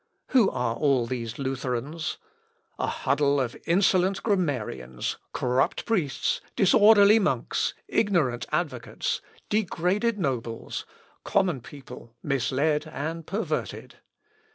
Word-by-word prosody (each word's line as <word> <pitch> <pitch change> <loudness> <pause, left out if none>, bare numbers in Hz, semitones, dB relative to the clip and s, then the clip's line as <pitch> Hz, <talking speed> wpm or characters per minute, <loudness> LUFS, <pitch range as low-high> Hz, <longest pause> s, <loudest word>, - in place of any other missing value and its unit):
Who 250 -6 +5
are 115 -2 -1
all 135 -4 +2
these 115 -2 -4
Lutherans? 135 +3 -3 0.6
A - - 0
huddle 140 0 +1
of 125 -3 -2
insolent 185 +1 +3
grammarians, 125 - -1
corrupt 125 +1 0
priests, 160 - 0
disorderly 210 +1 +6
monks, 205 - 0
ignorant 160 - +1
advocates, - - -2 0.3
degraded 210 +2 +1
nobles, 125 - -3 0.4
common 175 -9 +1
people 125 -4 -12
misled 145 +3 0
and 155 +3 -5
perverted. 205 +4 -3
150 Hz, 95 wpm, -26 LUFS, 125-190 Hz, 0.6 s, disorderly